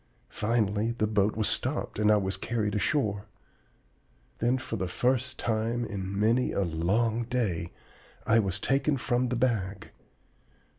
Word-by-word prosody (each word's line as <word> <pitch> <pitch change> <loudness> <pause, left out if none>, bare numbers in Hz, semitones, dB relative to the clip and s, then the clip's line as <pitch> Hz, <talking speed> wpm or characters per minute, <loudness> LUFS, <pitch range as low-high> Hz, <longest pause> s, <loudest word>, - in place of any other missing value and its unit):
Finally 110 0 0
the 110 - +2
boat 105 -1 +1
was 110 -1 0
stopped - - 0
and 105 0 +4
I 105 - +5
was 95 -1 -1
carried 105 +1 -2
ashore. 105 -3 0 1.1
Then 120 +3 +2
for 120 -3 -5
the 95 -3 -2
first 130 +6 0
time 115 +1 -1
in 100 -2 -4
many 115 +4 +2
a - - 0
long 105 +8 0
day 100 -9 -1 0.5
I 115 +1 +4
was 100 -2 -1
taken 140 +5 +1
from 125 0 0
the 125 - -1
bag. 110 -6 -1
110 Hz, 145 wpm, -28 LUFS, 100-120 Hz, 1.1 s, I